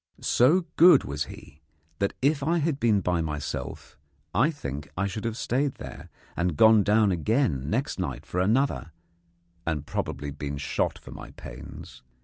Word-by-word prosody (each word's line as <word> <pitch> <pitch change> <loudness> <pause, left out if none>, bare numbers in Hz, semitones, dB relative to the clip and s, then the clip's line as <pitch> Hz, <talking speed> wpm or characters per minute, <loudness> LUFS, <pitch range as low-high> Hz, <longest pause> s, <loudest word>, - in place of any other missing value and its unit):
So 165 +9 +4
good 175 +2 +8
was 75 +1 -3
he 75 +3 -13 0.4
that, 100 - 0
if 145 +1 +3
I 165 +5 +1
had 155 -3 0
been 110 -4 +3
by 90 -1 0
myself, 75 -2 -5 0.3
I 130 +7 +4
think 70 - -6
I 100 - +1
should 100 +3 -4
have 115 -1 -2
stayed 135 +4 0
there, - - -9 0.3
and 85 -3 -1
gone 110 +2 +7
down 105 0 +3
again 90 - 0
next - - -1
night - - -4
for 90 - -3
another, 110 - +1 0.7
and 75 -3 -2
probably 70 0 -3
been 70 0 -5
shot 70 - -1
for - - -13
my - - -9
pains. - - -10
100 Hz, 160 wpm, -27 LUFS, -, 0.7 s, good